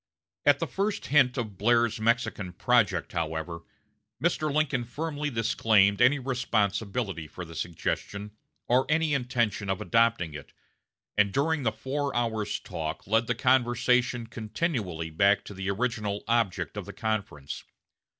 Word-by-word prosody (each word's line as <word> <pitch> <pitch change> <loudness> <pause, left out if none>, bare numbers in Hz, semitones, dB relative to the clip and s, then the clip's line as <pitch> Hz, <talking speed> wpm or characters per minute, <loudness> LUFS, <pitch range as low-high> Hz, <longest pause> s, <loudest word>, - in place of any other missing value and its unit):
At - - +7
the - - -1
first 200 +2 -2
hint 135 -3 +4
of 110 -6 -4
Blair's 115 +1 +3
Mexican 110 -5 0
project, 100 - +2
however, 80 0 -3 0.6
Mr. 155 0 +1
Lincoln 140 -4 +1
firmly 150 +4 -3
disclaimed 110 -4 +3
any 125 +4 +6
responsibility 110 - -1
for 90 +4 -8
the 80 - -11
suggestion, 100 +5 -3 0.4
or 125 +2 +3
any 155 -1 +2
intention 120 -6 0
of 95 - 0
adopting 115 -5 +2
it, 70 -2 -10 0.6
and 105 -1 +3
during 150 +6 +1
the 115 -4 +1
four 135 +5 -3
hours' 110 -3 -1
talk 80 0 -5
led 115 +3 +2
the 120 - 0
conversation 125 -1 +2
continually 110 - -3
back 100 +5 +3
to - - -8
the 95 0 -4
original 105 -1 -1
object 115 -5 0
of - - -5
the - - -7
conference. 100 -10 -3
115 Hz, 140 wpm, -28 LUFS, 100-125 Hz, 0.6 s, At